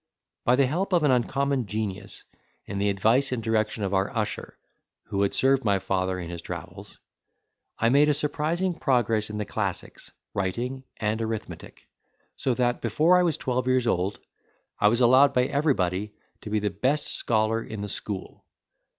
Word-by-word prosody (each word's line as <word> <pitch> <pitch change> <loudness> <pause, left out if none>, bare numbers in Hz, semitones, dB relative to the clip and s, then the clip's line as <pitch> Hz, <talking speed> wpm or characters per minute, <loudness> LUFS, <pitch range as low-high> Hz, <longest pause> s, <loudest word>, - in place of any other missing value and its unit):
By 125 - +5
the 135 +1 +4
help 180 +9 -1
of 170 -3 +3
an 145 - +4
uncommon 130 0 +1
genius, 105 -2 -4 0.4
and 100 0 -3
the 100 - +2
advice 115 +8 +2
and 120 -3 -2
direction 110 -1 0
of 100 0 -1
our 95 +1 +1
usher, 105 -2 -3 0.5
who 100 - -1
had 100 - +1
served 135 0 +3
my 100 -3 +3
father 95 -1 -1
in 85 -1 -6
his 85 -1 -6
travels, - - -8 0.8
I 115 - +2
made 145 +4 +5
a 150 - +3
surprising 165 +5 0
progress 115 -8 +1
in 105 - -5
the 105 - -2
classics, - - -4 0.2
writing, 120 +8 -3
and 110 +1 -1
arithmetic; 110 -1 -6 0.5
so 130 - 0
that, 120 0 0
before 155 - +3
I - - +4
was 170 -4 +2
twelve 125 0 -1
years 130 -1 +2
old, 95 -3 0 0.6
I 105 - +5
was 115 +4 +2
allowed 130 +3 +6
by 125 - +4
everybody 105 - 0 0.3
to - - -7
be 110 - 0
the 105 -1 0
best 130 - 0
scholar 110 0 +1
in 110 -2 -7
the 105 - -3
school. 100 -1 -6
115 Hz, 175 wpm, -26 LUFS, 105-135 Hz, 0.8 s, allowed